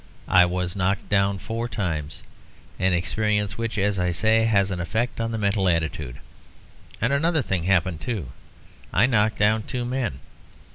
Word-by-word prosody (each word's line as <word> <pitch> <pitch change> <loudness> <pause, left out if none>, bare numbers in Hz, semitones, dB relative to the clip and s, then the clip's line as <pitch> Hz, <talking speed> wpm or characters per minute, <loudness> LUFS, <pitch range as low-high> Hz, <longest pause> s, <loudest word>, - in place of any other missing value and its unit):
I 90 -1 +8
was 90 +1 -2
knocked 95 +1 -1
down 100 -1 +2
four 115 +5 -4
times; 80 -9 -3 0.6
an 95 0 +2
experience 105 +3 0
which, 115 -1 -3
as 100 -1 +1
I 90 0 +1
say, 110 +5 +3
has 100 -3 +2
an 90 - -3
effect 115 +7 -2
on 115 0 -2
the 115 - -2
mental 100 -2 +1
attitude. 80 -6 -1 0.8
And 115 +5 +1
another 160 +1 +2
thing 90 -6 -2
happened, 90 -3 +1
too. 95 - -3 0.6
I - - +4
knocked 110 -4 +2
down 105 +1 +3
two 120 +3 -4
men. 120 - -2
100 Hz, 160 wpm, -24 LUFS, 90-115 Hz, 0.8 s, I